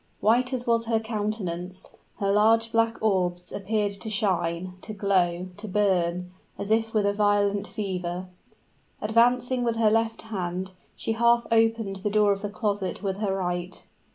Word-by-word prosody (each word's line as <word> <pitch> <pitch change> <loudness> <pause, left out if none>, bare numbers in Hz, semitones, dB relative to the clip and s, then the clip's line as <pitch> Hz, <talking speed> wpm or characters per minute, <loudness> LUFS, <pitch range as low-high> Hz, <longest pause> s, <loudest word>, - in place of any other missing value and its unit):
White 245 +4 +3
as 250 -2 -2
was 230 -1 +2
her 225 -1 +1
countenance, 205 -5 -4 0.2
her 195 -1 0
large 225 +2 +4
black 230 0 +2
orbs 180 -4 0
appeared 205 +1 -1
to 200 +2 -5
shine 185 -4 -1
to 215 - -7
glow 185 -3 +1
to 215 +1 -7
burn, 180 -3 +1 0.3
as 200 +1 -4
if 225 0 +1
with 210 -2 +3
a 200 - +2
violent 205 -1 +2
fever. 185 -3 -3 0.7
Advancing 245 +3 +2
with 235 -1 0
her 225 -2 +3
left 225 0 0
hand, 185 -3 -4 0.2
she - - -3
half 235 +1 +3
opened 225 -3 +2
the 205 +2 -2
door 210 0 +4
of 195 0 -1
the 205 - -3
closet 205 -2 -2
with 195 -1 -1
her 200 -2 -1
right. 180 -1 -3
205 Hz, 160 wpm, -26 LUFS, 185-225 Hz, 0.7 s, large